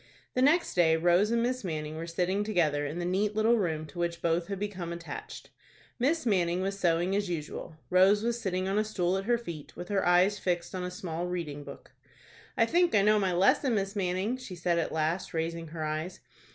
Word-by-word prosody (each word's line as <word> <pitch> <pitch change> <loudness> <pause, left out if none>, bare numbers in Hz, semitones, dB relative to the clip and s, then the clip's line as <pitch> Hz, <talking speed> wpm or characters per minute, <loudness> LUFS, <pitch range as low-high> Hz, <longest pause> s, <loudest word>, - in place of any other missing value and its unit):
The 255 - +1
next 310 +6 +3
day 165 -3 +4
Rose 175 +5 +3
and 235 0 +1
Miss 255 0 -1
Manning 155 -3 -4
were 165 +1 -5
sitting 180 +4 0
together 155 -8 +1
in 150 +4 -5
the 175 - -2
neat 200 +4 0
little 225 +2 +3
room 160 -5 -1
to 165 +3 -10
which 170 0 -1
both 170 +1 +1
had 200 0 -3
become 185 -4 -4
attached. 170 - -8 0.5
Miss 290 +6 +1
Manning 180 -5 +1
was 195 +1 -2
sewing 175 +1 +2
as 200 -2 -1
usual. 160 -1 -5
Rose 195 +3 +5
was 235 0 -1
sitting 185 -2 -1
on 195 +2 +1
a - - +2
stool 185 -4 0
at 195 0 -2
her 240 +1 +3
feet, 170 -11 -8
with 175 - -8
her 200 -2 +1
eyes 180 +3 +4
fixed 175 -2 -2
on 185 -1 -3
a 180 - -3
small 175 -1 -4
reading 160 -5 -4
book. - - -11 0.7
"I - - +5
think 350 0 +2
I 200 - +5
know 210 +1 +4
my 190 -2 +1
lesson, 195 +8 +3
Miss 195 0 -2
Manning," 190 +5 -1
she 250 -8 -8
said 170 0 0
at 165 - -2
last, 160 +3 -1
raising 165 +1 -2
her 160 0 -5
eyes. 155 +4 -3
180 Hz, 220 wpm, -29 LUFS, 170-205 Hz, 0.7 s, Rose